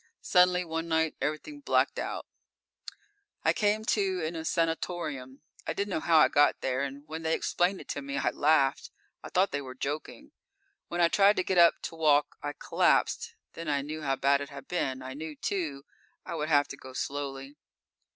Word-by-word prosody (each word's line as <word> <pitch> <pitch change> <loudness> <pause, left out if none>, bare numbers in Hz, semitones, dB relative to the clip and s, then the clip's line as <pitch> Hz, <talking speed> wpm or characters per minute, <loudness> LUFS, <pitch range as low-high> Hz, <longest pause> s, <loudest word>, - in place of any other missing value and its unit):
Suddenly, 180 0 +4
one 165 0 -3
night, 160 -1 +1
everything 220 - -3
blacked 285 - +1
out._ - - -4 1.2
_I - - +5
came 215 +1 +1
to 195 -4 +1
in 165 +2 -4
a 160 - -4
sanatorium. 160 -6 -2 0.3
I - - 0
didn't 200 0 -2
know - - 0
how 165 0 +3
I 155 - +7
got 145 0 +3
there, 130 0 -1
and 140 +2 -5
when 160 +1 -6
they 160 0 +1
explained 180 +2 0
it - - -14
to 145 - -3
me, 140 0 -4
I - - +1
laughed. 145 -3 +2 0.3
I - - -9
thought 190 +2 +2
they 145 - -2
were 130 -2 -9
joking. 155 - -5 0.6
When 175 - -2
I 170 - +6
tried 200 +4 +5
to - - 0
get 180 -1 +1
up, 170 -1 +5
to - - -5
walk, 150 -2 +3
I 145 0 -4
collapsed. - - +1 0.2
Then 165 0 -7
I 140 -2 0
knew 155 +2 -6
how 135 -2 0
bad 140 +1 +2
it 140 - -6
had 140 -2 -10
been. 130 -7 -2
I 130 0 -6
knew, 155 +2 -7
too, 150 -5 -3 0.4
I - - -5
would 155 -1 -2
have 145 -2 +4
to - - -7
go 130 0 -11
slowly. 140 0 -4
155 Hz, 200 wpm, -29 LUFS, 140-175 Hz, 1.2 s, I